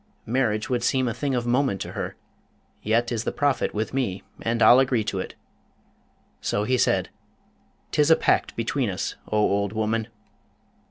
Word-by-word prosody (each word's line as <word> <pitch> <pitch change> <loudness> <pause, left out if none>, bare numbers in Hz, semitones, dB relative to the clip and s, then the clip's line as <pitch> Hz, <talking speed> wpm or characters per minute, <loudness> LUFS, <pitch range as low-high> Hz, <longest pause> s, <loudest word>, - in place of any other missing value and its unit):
Marriage 110 -3 0
would 125 -2 0
seem 130 0 +2
a 115 - -1
thing 135 +2 -2
of 120 -1 -1
moment 125 -4 +1
to - - -5
her, - - -5 0.7
yet 115 +3 +1
is 115 -2 -1
the - - -1
profit 145 -4 0
with 110 +3 -3
me, 120 -9 -2 0.2
and 115 0 +1
I'll 125 - +8
agree 130 -4 +2
to 100 -2 -3
it.' - - -6 1.0
So 105 - -1
he 130 +4 +1
said, 125 - +1 0.8
''Tis 150 +1 +3
a 160 - +8
pact - - +1
between 115 +1 -1
us, 95 - -3
O 110 - -1
old 100 -1 +1
woman!' 110 +1 -1
115 Hz, 170 wpm, -25 LUFS, 105-130 Hz, 1.0 s, I'll